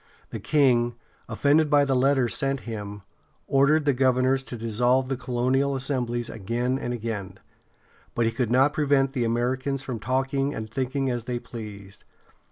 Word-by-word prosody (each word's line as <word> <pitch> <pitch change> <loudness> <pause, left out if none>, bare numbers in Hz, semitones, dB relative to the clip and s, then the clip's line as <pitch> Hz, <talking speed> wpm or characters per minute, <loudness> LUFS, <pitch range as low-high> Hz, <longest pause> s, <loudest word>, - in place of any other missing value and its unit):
The 115 - -5
king, 120 0 +2 0.3
offended 145 +7 +3
by 145 -1 +4
the 135 - 0
letters 130 -1 +2
sent 135 -2 -1
him, 105 -3 -7 0.4
ordered 145 +3 +3
the 145 - +3
governors 130 +1 +2
to 120 - -6
dissolve 120 +4 +1
the 135 - 0
colonial 130 +2 0
assemblies 125 -3 -2
again 120 +5 -2
and 120 - -3
again; 105 -5 -5 0.8
but 120 - +1
he 115 - +1
could 120 0 -1
not 135 +4 +4
prevent 140 -3 +2
the 125 -4 0
Americans 130 +4 -1
from 125 -4 -5
talking 135 +4 -1
and 110 - -5
thinking 135 +1 -1
as 120 -2 -3
they 125 0 -2
pleased. 105 -4 -9
125 Hz, 160 wpm, -25 LUFS, 115-135 Hz, 0.8 s, by